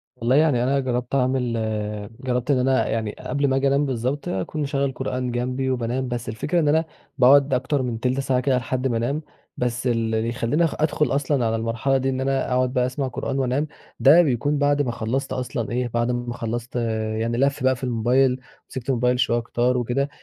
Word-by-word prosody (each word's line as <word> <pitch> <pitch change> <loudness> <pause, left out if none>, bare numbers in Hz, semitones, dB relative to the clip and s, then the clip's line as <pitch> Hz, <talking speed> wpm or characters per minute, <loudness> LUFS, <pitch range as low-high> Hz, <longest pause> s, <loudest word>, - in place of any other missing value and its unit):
والله 125 +1 +1
يعني 145 -5 +3
أنا 135 +2 +2
جرّبت 125 -1 -2
أعمل 130 -2 +1 0.7
جرّبت 125 +1 -1
إن 135 - +3
أنا 130 +1 +2
يعني 110 -2 -1
قبل 140 +2 -1
ما 135 - +1
آجي 135 +1 +2
أنام 140 +2 +2
بالضبط 130 +2 -2
أكون 95 - -3
مشغّل 140 -1 0
قرآن 125 0 -3
جنبي 125 +2 -1
وبانام، 125 +1 -1
بس 120 -2 -4
الفكرة 130 +10 -1
إن 155 - +1
أنا 160 +2 +3 0.3
باقعُد 140 +1 +6
أكتر 135 +2 0
من 120 -3 -3
تِلْت 125 +2 0
ساعة 135 -2 +1
كده 130 0 +1
لحد 130 +1 -1
ما 120 -3 0
أنام. 135 +7 -1 0.4
بس 125 +1 -1
ال - - +3 0.2
اللي 110 +1 0
يخلّيني 125 +7 0
أخ 165 - 0
أدخُل 155 0 +1
أصلًا 140 -3 +1
على 115 0 +1
المرحلة 115 +4 0
دي 135 0 0
إن 130 0 -2
أنا 135 0 0
أقعُد 125 0 +1
بقى 125 -2 +2
أسمع 130 +2 -2
قرآن 135 +2 -3
وأنام، 135 +3 0 0.3
ده 150 +6 +7
بيكون 145 -1 +1
بعد 145 0 +2
ما 130 -4 -1
خلّصت 120 +4 -2
أصلًا 125 -3 -3
إيه، 125 +1 0
بعد 120 +1 +1
ما 120 0 -3
خلّصت 120 +1 -5 0.4
يعني 115 +1 -1
لَف 140 0 +1
بقى 130 0 +3
في 125 - -12
الmobile، 125 +2 +2 0.3
مسكت 130 0 -3
الmobile 125 0 +2
شوية 125 -1 +1
كتار 120 +2 0
وكده، 125 +4 0
130 Hz, 205 wpm, -23 LUFS, 120-135 Hz, 0.7 s, ده